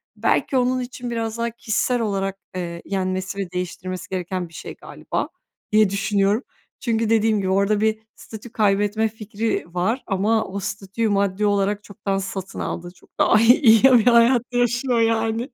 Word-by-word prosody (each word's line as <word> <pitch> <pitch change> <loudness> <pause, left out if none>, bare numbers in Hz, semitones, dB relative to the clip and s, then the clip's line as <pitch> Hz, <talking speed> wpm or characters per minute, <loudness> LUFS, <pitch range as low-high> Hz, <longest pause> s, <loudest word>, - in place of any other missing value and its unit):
belki 265 - +1
onun 255 +1 +1
için 245 -1 -6
biraz 225 -1 -3
daha 235 0 -1
kişisel 235 +2 -1
olarak, 195 -2 -2 0.2
eee, 170 -1 -5
yenmesi 190 0 -2
ve 190 -3 -4
değiştirmesi 180 0 -5
gereken 180 -1 -3
bir - - -21
şey - - -8
galiba - - -5 0.4
diye 215 -2 +5
düşünüyorum. 200 +3 +1 0.4
Çünkü 225 -3 0
dediğim 220 -1 +3
gibi 190 - -2
orada 200 +2 +2
bir 220 0 +1 0.2
statü 220 +1 -11
kaybetme 205 +1 +1
fikri 220 0 -3
var 220 +9 -1
ama 215 +2 +1
o 195 +1 -5
statüyü 205 +2 -3
maddi 200 0 +1
olarak 205 0 +1
çoktan 200 -1 -3
satın 190 0 -5
aldı, 175 0 -4
çok - - -23
daha 220 - +5
iyi 245 +6 +5
iyi 225 -3 +6
bir 250 -4 +6
hayat 235 0 +5
yaşıyor 245 0 +1
yani. 225 +2 0
215 Hz, 160 wpm, -22 LUFS, 195-230 Hz, 0.4 s, iyi